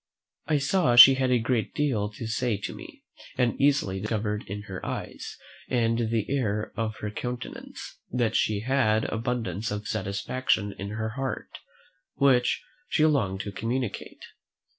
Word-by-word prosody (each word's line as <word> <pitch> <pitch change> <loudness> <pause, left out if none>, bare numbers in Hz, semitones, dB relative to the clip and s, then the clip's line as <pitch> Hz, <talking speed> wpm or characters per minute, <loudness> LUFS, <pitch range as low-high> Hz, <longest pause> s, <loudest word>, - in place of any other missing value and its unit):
I 155 - +3
saw 140 -3 +2
she 135 +2 +12
had 130 -1 +1
a 125 - +4
great 115 -1 -1
deal 125 -9 0
to 115 - -6
say 115 -1 0
to 100 -2 -5
me, - - -12 0.3
and 125 -2 +2
easily 135 -9 +2
discovered 105 0 -2
in 105 +2 -5
her 95 -2 -7
eyes, - - -5 0.3
and 115 -2 +1
the 110 -2 0
air 110 -6 -1
of 110 -1 -2
her 105 - -3
countenance, 125 +3 -6
that 120 -2 0
she 105 -2 +1
had 115 -3 +2
abundance 115 -2 -2
of 105 +1 -4
satisfaction 100 +1 -1
in 100 +1 -4
her 110 +1 -3
heart, 135 +3 -5 0.6
which 130 -3 +3 0.3
she 155 - +3
longed 100 -11 +1
to 100 - -5
communicate. 115 +1 -4
115 Hz, 150 wpm, -27 LUFS, 105-130 Hz, 0.6 s, she